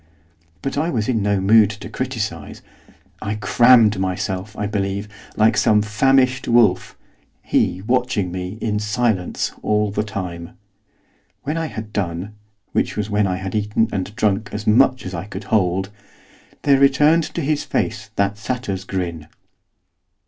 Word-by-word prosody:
But 135 +1 -2
I 160 +3 0
was 110 -9 -1
in 115 -4 +1
no 100 -1 +1
mood 105 +2 +5
to 105 -1 -8
criticise; 110 - -5 0.6
I 105 0 -2
crammed 115 -1 +5
myself, 95 +2 -3
I 105 - -2
believe, 100 0 -2 0.3
like 110 +1 +3
some 105 -1 +3
famished 130 +4 +2
wolf, 110 -6 +3 0.5
he 95 +2 0
watching 120 -5 0
me, 90 +3 -5
in 105 -2 -1
silence, 105 -3 -1
all 105 -1 +1
the 105 - -1
time. 90 -5 -6 0.9
When 150 - -2
I 165 -1 -2
had 110 -6 -8
done, 90 +1 -3 0.4
which - - -1
was 105 0 -2
when 105 -1 +2
I 90 - -1
had 95 +1 -5
eaten 105 +1 0
and 100 +2 -4
drunk 105 0 0
as 105 +1 -5
much 130 +4 +3
as 95 - -6
I 85 +2 -4
could 100 0 -7
hold, 95 -1 0 0.7
there 140 -2 +4
returned 150 +4 +4
to 170 - -1
his 150 0 0
face - - -2
that 100 +1 0
satyr's 110 -5 -4
grin. 85 -5 -4
105 Hz, 150 wpm, -20 LUFS, 95-120 Hz, 0.9 s, mood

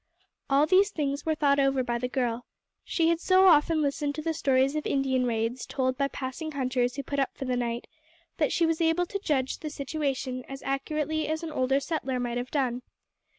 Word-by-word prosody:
All 280 +2 +4
these 380 +5 +4
things 290 -4 -3
were 315 - +2
thought 285 -2 +3
over 270 -1 +2
by 240 -1 -2
the 250 - -1
girl. 245 -2 -2 0.4
She 330 -1 +1
had 335 -1 +2
so 370 +2 +4
often 315 -2 +5
listened 285 0 -1
to 310 - -5
the 325 0 0
stories 275 -2 +2
of 305 - -2
Indian 260 -2 +1
raids 230 +2 -1
told 260 -1 0
by 275 +1 +1
passing 280 +4 -5
hunters 255 -2 0
who 280 - -4
put 280 +2 -3
up 270 - -1
for 270 - -4
the 255 -1 0
night, 240 -1 -2 0.5
that 300 - +1
she 335 - +2
was 325 0 0
able 330 +2 +2
to 400 +3 -4
judge 270 -8 -1
the 310 - -5
situation 275 -3 -3
as 270 0 -8
accurately 305 +3 -1
as 315 +2 -2
an 325 - -4
older 270 -1 +1
settler 275 -4 -2
might 240 -1 -2
have 245 +1 -4
done. 255 -4 -1
275 Hz, 210 wpm, -28 LUFS, 255-310 Hz, 0.5 s, often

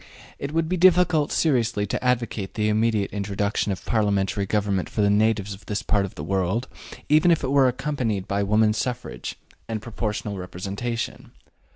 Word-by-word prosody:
It 140 - -4
would 165 0 0
be 185 +2 -1
difficult 180 -4 +4
seriously 120 -8 +1
to 105 - -3
advocate 120 -5 -1
the 105 -1 +1
immediate 110 -1 +1
introduction 100 +1 -1
of 95 - -5
parliamentary 100 -2 +1
government 100 -3 0
for 110 - -1
the 100 0 +4
natives 105 -1 +2
of 95 - -14
this 105 +1 -2
part 100 -3 +1
of 95 - -9
the 75 - -6
world, 95 +7 0 0.4
even 155 +4 +5
if 165 -3 +3
it 130 - -1
were 140 -2 +5
accompanied 125 -7 -2
by 100 0 0
women's 105 +2 +2
suffrage 125 - -4 0.3
and 110 -1 -2
proportional 105 -2 -4
representation. 100 +6 -5
110 Hz, 170 wpm, -24 LUFS, 100-125 Hz, 0.4 s, even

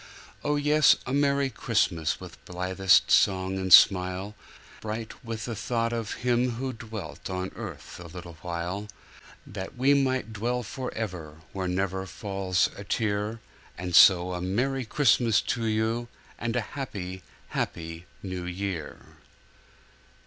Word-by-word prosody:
Oh, 150 - +1
yes! 150 +1 +5
a 130 - -3
Merrie 140 -1 +2
Christmas 95 - 0
With - - -11
blithest 95 +1 +3
song 95 -1 +3
and 95 -1 -3
smile, 95 +2 +6 0.5
Bright 110 +1 -6
with 115 -1 -5
the 115 - -4
thought 115 +1 -1
of 115 -2 -3
him 125 0 +2
who 130 +2 -3
dwelt 110 -3 -7
On 95 0 -3
earth - - -8
a 90 - -9
little 85 +1 -9
while, 90 +4 -4 0.6
That 95 +3 -7
we 135 +3 +4
might 130 -5 +1
dwell 120 +3 -1
forever 90 - -5
Where 95 -1 -2
never 95 +1 -1
falls 95 -2 0
a 100 - -8
tear; 105 +1 -1 0.5
So 90 +1 +7
a 90 - -3
Merrie 125 +8 0
Christmas 120 -3 +3
to 115 -2 -2
you, 110 +2 0 0.3
And 115 0 -2
a 125 - +2
happy, 95 -9 -5 0.3
happy 80 +1 -4 0.2
year. 90 -2 -4
105 Hz, 130 wpm, -27 LUFS, 90-120 Hz, 0.6 s, So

